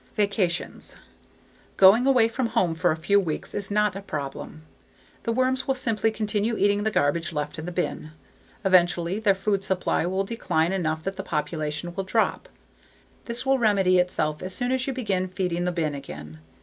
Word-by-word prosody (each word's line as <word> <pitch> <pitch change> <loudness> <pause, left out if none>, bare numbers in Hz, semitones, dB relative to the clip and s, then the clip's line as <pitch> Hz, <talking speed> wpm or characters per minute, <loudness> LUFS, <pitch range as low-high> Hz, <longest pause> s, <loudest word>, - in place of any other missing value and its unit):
Vacations 200 -4 -1 0.8
Going 205 +7 +7
away 250 -4 +5
from 235 +2 -1
home 225 -8 +1
for 170 +2 +1
a 155 - -1
few 200 +5 +3
weeks 165 -6 -4
is 200 -1 -4
not 210 0 +1
a 195 - -5
problem. 150 -2 -6 0.6
The 230 - -2
worms 255 +2 0
will 270 - +2
simply 225 -4 +1
continue 215 +1 -1
eating 205 +1 +2
the 220 - +1
garbage 165 -3 +1
left 150 +1 -3
in 160 - -6
the - - -3
bin. 175 -3 -3 0.6
Eventually 180 0 +3
their 205 -3 +3
food 195 0 -1
supply 185 -3 0
will 190 +2 0
decline 190 -6 0
enough 160 -4 -1
that 195 +2 -4
the - - -2
population 155 +1 -3
will 195 - -3
drop. 220 +4 0 0.8
This 235 +2 -3
will 270 0 +3
remedy 195 -5 +3
itself 155 -4 0
as 185 0 -5
soon 245 0 -1
as 260 0 0
you 270 - -1
begin 195 -7 -1
feeding 180 -1 -2
the 180 - +1
bin 160 -4 -1
again. 75 - -9
190 Hz, 180 wpm, -25 LUFS, 170-220 Hz, 0.8 s, Going